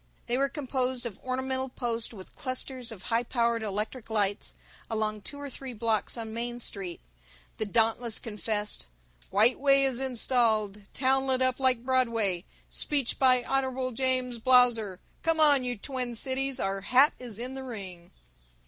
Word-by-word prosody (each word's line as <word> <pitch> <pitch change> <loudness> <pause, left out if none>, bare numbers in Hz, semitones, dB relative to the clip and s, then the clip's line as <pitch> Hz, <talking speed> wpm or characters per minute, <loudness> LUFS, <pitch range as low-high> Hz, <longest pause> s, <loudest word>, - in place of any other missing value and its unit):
They 240 - 0
were 275 +2 +2
composed 260 -3 -2
of 215 -5 -6
ornamented 260 0 -2
posts 235 -2 -1
with 190 -5 -12
clusters 255 -2 -2
of 200 -4 -10
high 230 0 +1
powered 235 -1 +1
electric 215 +3 -3
lights 205 -2 -1 0.3
along 215 -1 -1
two 285 +7 -7
or 285 - -5
three 265 -1 -7
blocks 225 0 0
on 225 -1 -5
Main 240 +1 -3
Street. 195 -6 -3 0.6
The 220 - -1
Dauntless 225 +1 +2
confessed: 210 - -3 0.4
"White 215 +6 +4
Way 275 0 +5
Is 260 -2 -1
Installed 225 -5 +1
Town 265 +1 +2
Lit 260 -1 +3
Up 255 0 +1
Like 255 -2 +2
Broadway 230 -8 +2 0.2
Speech 280 -5 -1
by 255 -2 +5
Hon. 260 -1 0
James 255 -1 0
Blausser 235 -5 +4 0.2
Come 325 -1 +1
On 290 -4 +6
You 245 -1 -2
Twin 250 +1 -4
Cities 265 +2 -2
Our 195 0 -1
Hat 255 +8 +5
Is 240 -5 -8
In 250 +3 -5
the 265 - -6
Ring." 190 -8 -7
245 Hz, 155 wpm, -29 LUFS, 220-260 Hz, 0.6 s, On